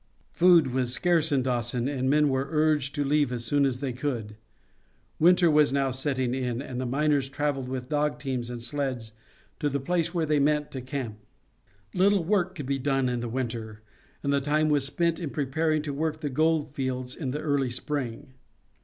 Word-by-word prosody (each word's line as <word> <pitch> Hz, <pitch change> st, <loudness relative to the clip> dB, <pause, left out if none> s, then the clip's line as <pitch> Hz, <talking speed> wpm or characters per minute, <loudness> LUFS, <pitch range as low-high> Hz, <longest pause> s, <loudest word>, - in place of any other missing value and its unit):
Food 170 Hz, -7 st, +5 dB
was 125 Hz, -2 st, 0 dB
scarce 165 Hz, +2 st, +2 dB
in 135 Hz, -3 st, +2 dB
Dawson, 120 Hz, -1 st, -1 dB
and 130 Hz, -2 st, -1 dB
men 150 Hz, +1 st, +4 dB
were 135 Hz, +1 st, 0 dB
urged 150 Hz, -3 st, +1 dB
to 145 Hz, -1 st, 0 dB
leave 145 Hz, -2 st, +2 dB
as 120 Hz, -1 st, -3 dB
soon 140 Hz, +4 st, +3 dB
as 125 Hz, 0 st, -3 dB
they 135 Hz, -3 st, -2 dB
could. 120 Hz, -5 st, -3 dB, 0.8 s
Winter 175 Hz, 0 st, +5 dB
was 150 Hz, -2 st, +4 dB
now 135 Hz, -1 st, +1 dB
setting 130 Hz, -1 st, -1 dB
in, 125 Hz, -2 st, -2 dB
and 130 Hz, -2 st, -5 dB
the 130 Hz, -, -2 dB
miners 140 Hz, +1 st, +1 dB
traveled 140 Hz, -2 st, -2 dB
with 130 Hz, -1 st, -5 dB
dog 150 Hz, 0 st, 0 dB
teams 130 Hz, -4 st, -3 dB
and 120 Hz, -1 st, -6 dB
sleds 125 Hz, -3 st, -3 dB, 0.5 s
to 150 Hz, -, 0 dB
the 140 Hz, 0 st, -1 dB
place 165 Hz, +4 st, 0 dB
where 170 Hz, -2 st, 0 dB
they 150 Hz, -1 st, +2 dB
meant 150 Hz, +1 st, +1 dB
to 130 Hz, -, -5 dB
camp. 125 Hz, -4 st, -5 dB, 0.7 s
Little 195 Hz, 0 st, +3 dB
work 185 Hz, 0 st, +1 dB
could 145 Hz, -6 st, -6 dB
be 135 Hz, +1 st, -1 dB
done 135 Hz, -1 st, +1 dB
in 125 Hz, -1 st, -1 dB
the 120 Hz, 0 st, -4 dB
winter, 115 Hz, -3 st, -4 dB, 0.4 s
and 140 Hz, 0 st, +1 dB
the 140 Hz, -, +2 dB
time 155 Hz, +2 st, +1 dB
was 145 Hz, -2 st, +2 dB
spent 170 Hz, +2 st, 0 dB
in 165 Hz, -4 st, -3 dB
preparing 155 Hz, +2 st, 0 dB
to 145 Hz, -2 st, -4 dB
work 155 Hz, +2 st, -2 dB
the 145 Hz, -3 st, -2 dB
gold 155 Hz, 0 st, +1 dB
fields 130 Hz, -3 st, -3 dB
in 140 Hz, -6 st, -4 dB
the 145 Hz, +4 st, -3 dB
early 145 Hz, -4 st, 0 dB
spring. 130 Hz, 0 st, -4 dB
140 Hz, 200 wpm, -27 LUFS, 130-150 Hz, 0.8 s, Food